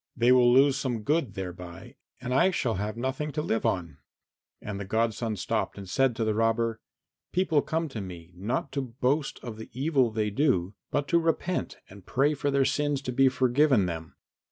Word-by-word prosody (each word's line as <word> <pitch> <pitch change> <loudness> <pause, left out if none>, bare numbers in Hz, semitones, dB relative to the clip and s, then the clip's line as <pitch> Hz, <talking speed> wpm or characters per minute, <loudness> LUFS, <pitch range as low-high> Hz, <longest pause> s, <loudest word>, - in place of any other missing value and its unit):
They 120 +1 +4
will 125 -1 +6
lose 135 +2 +5
some 120 -5 -2
good 140 - 0
thereby, 90 -2 -7 0.2
and 125 - -3
I 175 +8 +5
shall 130 -10 0
have 105 +3 -3
nothing 130 +5 -2
to 150 - -1
live 115 - 0
on." 85 -5 -2 0.6
And 100 -2 -6
the - - -3
godson 110 +2 -1
stopped 110 +3 -2
and 100 -1 -8
said 130 +5 +2
to 115 - -1
the 110 -1 +1
robber, 115 +1 +1 0.5
"People 170 -5 +2
come 160 +2 -2
to 115 -6 -5
me 90 -2 -9
not 120 +9 -2
to 140 +1 -1 0.2
boast 140 +3 +1
of 115 -3 -6
the 110 - -9
evil 135 -4 +2
they 110 -1 -1
do, 105 - +1 0.2
but 145 0 -1
to 170 - +4
repent 165 +2 -1
and 100 0 -14
pray 140 +9 +2
for 145 0 -1
their 140 -1 +3
sins 145 +1 0
to 125 - -3
be 135 +1 +4
forgiven 130 -3 +3
them. 80 -2 -5
120 Hz, 195 wpm, -27 LUFS, 105-140 Hz, 0.6 s, will